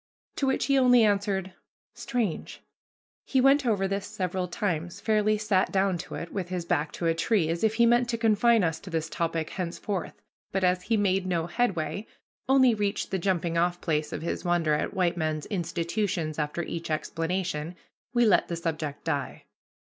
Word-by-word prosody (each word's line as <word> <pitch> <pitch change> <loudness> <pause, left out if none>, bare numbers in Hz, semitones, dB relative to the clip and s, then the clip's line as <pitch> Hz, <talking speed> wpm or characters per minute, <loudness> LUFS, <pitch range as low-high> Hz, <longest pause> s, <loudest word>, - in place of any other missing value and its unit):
To 275 - +1
which 265 - +1
he 275 -1 +3
only 245 -2 +6
answered, 200 -2 0 0.4
"Strange!" 235 -10 -3 0.6
He 265 - +1
went 270 +1 +4
over 195 -4 +2
this 195 0 -3
several 185 0 -2
times, 175 -3 -3
fairly 215 -1 +2
sat 210 -3 +1
down 190 -2 +1
to - - -7
it, 170 - -6
with 185 -3 -3
his 180 -2 -3
back 155 -3 0
to 170 - -4
a 165 - +3
tree, 165 0 +1
as 170 +3 -2
if 220 0 +2
he 235 +1 +5
meant 240 +1 +3
to 230 - 0
confine 225 0 +4
us 160 -2 0
to 190 - -10
this 165 -2 -2
topic 165 -1 -2
henceforth; 185 +2 -4 0.3
but 190 0 -1
as 180 0 +3
he 220 +4 0
made 195 -2 +1
no 170 -3 0
headway, 175 -2 -1 0.4
only 260 -2 +6
reached 205 -1 -2
the 190 - 0
jumping 170 -2 0
off 175 +1 +1
place 150 -2 -1
of 155 - -5
his 170 - -3
wonder 175 -3 +2
at 150 - -1
white 180 -2 +1
men's 155 -2 -1
institutions 170 -2 -2
after 150 +3 -2
each 170 0 -5
explanation, 165 +1 -2 0.4
we 240 -1 +3
let 210 - +4
the 170 - -3
subject 155 -3 -4
die. 140 -2 -3
185 Hz, 185 wpm, -27 LUFS, 165-215 Hz, 0.6 s, only